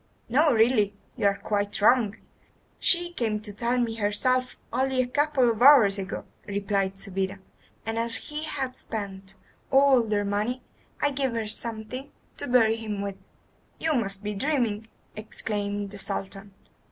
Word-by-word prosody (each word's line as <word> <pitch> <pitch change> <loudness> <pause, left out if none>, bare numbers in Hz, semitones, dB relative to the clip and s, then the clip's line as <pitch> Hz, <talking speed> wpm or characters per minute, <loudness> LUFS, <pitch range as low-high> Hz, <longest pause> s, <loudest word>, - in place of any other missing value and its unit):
"No; 295 +6 +4
really 220 -3 +3 0.2
you 205 - +2
are 200 0 +1
quite 205 -1 -1
wrong. 220 0 +4 0.6
She 350 -1 +2
came 220 -7 -1
to 210 -1 -5
tell 235 +4 0
me 235 -2 +1
herself 240 +4 0 0.2
only 265 0 +1
a 255 - +3
couple 275 -1 +2
of 225 0 -5
hours 240 -8 +7
ago," 190 -2 -5 0.2
replied 200 -1 -1
Subida, 195 0 -2 0.5
"and 225 0 -2
as 230 0 -2
he 300 0 -6
had 270 -5 -3
spent 195 -4 -6 0.3
all 270 -2 +6
their 210 -2 0
money, 215 +5 -1 0.4
I 290 - +3
gave 270 -3 -1
her 225 -1 -1
something 230 +4 -4 0.3
to - - -4
bury 225 -3 +4
him 210 -3 -4
with." 200 -1 -4 0.6
"You 320 -1 0
must 200 -6 -1
be 210 0 -2
dreaming," 225 -3 0 0.3
exclaimed 205 -1 -3
the 205 - -6
Sultan. 195 +1 -4
220 Hz, 155 wpm, -26 LUFS, 205-255 Hz, 0.6 s, hours